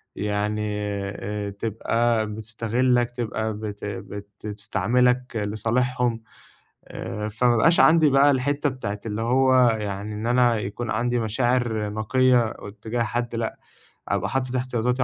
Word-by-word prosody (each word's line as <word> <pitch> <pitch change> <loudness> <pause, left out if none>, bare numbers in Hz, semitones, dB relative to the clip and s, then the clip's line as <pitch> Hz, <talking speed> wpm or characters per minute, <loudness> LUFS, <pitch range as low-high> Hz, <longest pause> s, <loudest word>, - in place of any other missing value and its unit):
يعني 105 +1 -1
آآ 105 0 -3
تبقى 115 +2 0
بتستغلّك، 115 +3 0
تبقى 110 -2 -3
بت 105 -1 -6
بت 100 0 -6 0.2
بتستعملك 125 +4 0
لصالحهم. 115 +3 0 0.6
آآ 105 +2 -5
فما 120 +3 +2
بقاش 165 +9 +4
عندي 160 -2 +6
بقى 140 +1 +5
الحتّة 140 +2 +1
بتاعة 105 -6 -5
اللي 110 0 -3
هو 130 +3 +3
يعني 105 -2 -3
إن 105 +2 -4
أنا 120 -1 +3
يكون 105 +3 -4
عندي 120 +2 0
مشاعر 115 -1 0
نقية 115 +2 +2
اتّجاه 110 +3 -4
حد 120 +1 -2
لأ، 115 -1 -3 0.5
أبقى 100 0 -1
حاطط 130 -1 -2
احتياطاتي 125 0 0
115 Hz, 125 wpm, -24 LUFS, 105-125 Hz, 0.6 s, عندي